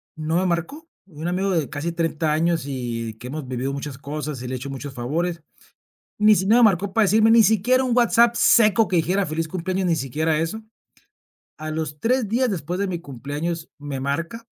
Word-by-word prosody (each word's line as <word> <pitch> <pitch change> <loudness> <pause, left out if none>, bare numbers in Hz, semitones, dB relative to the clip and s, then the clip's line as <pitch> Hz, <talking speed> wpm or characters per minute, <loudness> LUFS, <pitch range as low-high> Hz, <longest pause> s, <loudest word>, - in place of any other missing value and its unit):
no 160 +2 -1
me 185 - +1
marcó. 180 - -3 0.2
Un 160 -2 -7
amigo 190 +2 0
de 160 -6 0
casi 150 +4 -3
30 165 -2 0
años 165 0 +1
y 120 -4 -4
que 120 +3 -10
hemos 145 0 -6
vivido 130 +2 -3
muchas 140 -1 -6
cosas 150 -2 -5
y 125 - -6
le 130 - -3
he - - -3
hecho 135 +3 -7
muchos 135 0 -7
favores. 160 +7 -2 0.8
Ni 210 0 +6
si 190 - 0
no 225 +3 +5
me - - +5
marcó 195 -2 +3
para 225 0 +3
decirme 220 +3 +4
Ni 230 -1 +7
siquiera 225 +5 +3
un 250 -1 0
WhatsApp, 235 0 +4
seco, 215 -1 +5
que 185 - -1
dijera: 185 +4 +1
"Feliz 160 +1 -3
cumpleaños", 185 +1 -2
ni 165 -2 +2
siquiera 155 +4 -1
eso. 190 +8 -3 1.0
A 155 0 -6
los 155 -2 -4
3 240 -3 +1
días, 245 +2 +1
después 175 0 -3
de 200 - 0
mi 175 -2 -3
cumpleaños, 150 +4 -5
me 145 -2 -5
marca. 170 - -3
165 Hz, 205 wpm, -22 LUFS, 145-200 Hz, 1.0 s, Ni